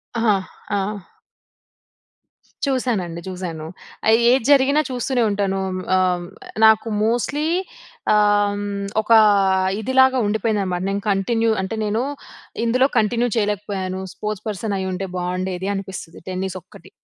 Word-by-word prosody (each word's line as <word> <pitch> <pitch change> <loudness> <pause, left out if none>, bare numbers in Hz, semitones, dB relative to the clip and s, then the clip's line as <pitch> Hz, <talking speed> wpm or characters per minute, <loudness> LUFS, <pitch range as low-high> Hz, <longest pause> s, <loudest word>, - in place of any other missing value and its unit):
ఆ! 215 -4 +2 0.3
ఆ! 205 -1 0 1.9
చూసానండి. 210 -11 -1
చూసాను. 175 -4 -5 0.7
ఏది 255 -2 +3
జరిగినా 280 +2 +5
చూస్తూనే 250 -1 0
ఉంటాను. 195 -1 -1 0.4
ఆహ్, 180 -1 +1 0.4
నాకు 220 +1 +5 0.2
మోస్ట్‌లీ 260 +6 0 0.7
ఆహ్, 205 -1 +3 0.4
ఒక 220 - -6 0.7
ఇదిలాగా 260 +2 +4
ఉండిపోయిందన్నమాట. 205 -4 -1
నేను 200 +1 -2
కంటిన్యూ 225 +4 +1
అంటే, 190 +4 -3
నేను 215 +2 0 0.6
ఇందులో 255 +3 +3
కంటిన్యూ 235 +3 +2
చేయలేకపోయాను. 200 -3 -2
స్పోర్ట్స్ 210 -1 -5
పర్సన్ 205 0 -3
అయ్యి 190 0 -2
ఉంటే, 195 +1 -3
బాగుండేది 185 +1 -2
అనిపిస్తది 190 -3 -7
టెన్నిస్ 185 0 -3
ఒక్కటి. - - -16
205 Hz, 105 wpm, -21 LUFS, 190-230 Hz, 1.9 s, జరిగినా